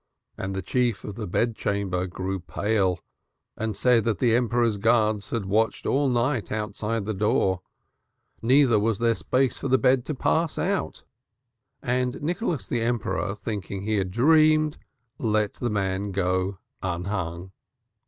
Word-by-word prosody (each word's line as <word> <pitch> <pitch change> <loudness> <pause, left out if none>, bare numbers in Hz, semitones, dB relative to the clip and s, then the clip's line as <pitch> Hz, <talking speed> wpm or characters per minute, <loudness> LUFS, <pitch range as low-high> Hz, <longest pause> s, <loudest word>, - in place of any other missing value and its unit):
And 95 0 -4
the 95 - -3
chief 120 0 0
of 105 - -6
the 105 +1 -5
bed 115 +6 0
chamber 100 -4 -1
grew 95 +2 -4
pale 95 0 0 0.5
and 110 -2 -3
said 125 -3 +4
that 115 -3 +1
the 120 -3 +2
Emperor's 120 -2 +2
guards 110 -2 +2
had 115 -4 -2
watched 110 +4 0
all 140 0 +2
night 120 -1 0
outside 105 0 -2
the 110 - -2
door, 100 -2 +1 0.8
neither 125 -2 +4
was 110 0 +1
there 115 0 +2
space 130 +3 0
for - - -3
the 130 0 +4
bed 130 -1 +3
to 155 - -3
pass 160 +4 0
out. 195 +2 -1 0.8
And 125 +1 0
Nicholas 175 - -2
the 120 - -1
Emperor, 115 -3 -1
thinking 100 -3 -5
he 110 +1 0
had 95 -2 0
dreamed, 155 - +4 0.4
let 105 -3 +1
the 120 - -3
man 100 -1 -1
go 95 0 0 0.2
unhung. 90 -1 -3
110 Hz, 150 wpm, -25 LUFS, 100-125 Hz, 0.8 s, said